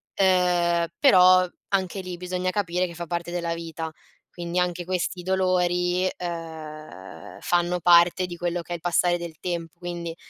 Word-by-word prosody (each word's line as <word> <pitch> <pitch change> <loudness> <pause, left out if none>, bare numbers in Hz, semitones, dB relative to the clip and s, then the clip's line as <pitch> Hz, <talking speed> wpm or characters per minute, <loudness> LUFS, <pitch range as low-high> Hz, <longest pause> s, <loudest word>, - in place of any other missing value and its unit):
ehm, 175 -2 +3
però 185 -8 +7 0.2
anche 195 -1 -1
lì 180 -1 -6
bisogna 180 +1 -2
capire 185 -2 0
che 170 - -9
fa 170 +1 -5
parte 175 +1 -3
della 170 -1 -2
vita, 165 -1 -6 0.4
quindi 175 0 -3
anche 180 -1 -1
questi 180 0 -2
dolori, 180 -1 +1
ehm, 155 - -8
fanno 175 0 +1
parte 175 +2 +5
di 175 -1 -8
quello 175 0 -2
che 175 - -14
è - - -1
il 170 - -9
passare 175 +1 +2
del 170 -2 -7
tempo. 170 -2 -4
Quindi 170 -2 -5
175 Hz, 155 wpm, -25 LUFS, 170-180 Hz, 0.4 s, però